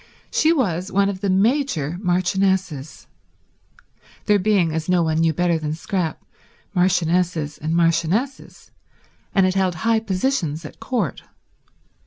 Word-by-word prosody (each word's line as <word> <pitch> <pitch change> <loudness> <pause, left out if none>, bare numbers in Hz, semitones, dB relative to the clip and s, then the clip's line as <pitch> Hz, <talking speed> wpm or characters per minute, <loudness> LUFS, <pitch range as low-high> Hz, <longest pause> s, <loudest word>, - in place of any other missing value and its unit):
She 315 - +3
was 195 - 0
one 200 +1 +2
of 190 -2 -5
the 200 - 0
major 190 - +1
marchionesses—there 180 -4 0 1.3
being, 185 -5 +2
as 160 +1 -3
no 180 -2 +3
one 160 0 0
knew 165 0 +3
better 170 +1 +1
than 155 0 -3
Scrap, 175 -2 -3 0.5
marchionesses 175 -4 +1
and 160 +2 -2
marchionesses—and 175 - -2
had 185 - +1
held 190 -2 +1
high 225 +4 +1
positions 185 - -1
at - - -10
Court. 220 - -2
180 Hz, 120 wpm, -21 LUFS, 165-200 Hz, 1.3 s, She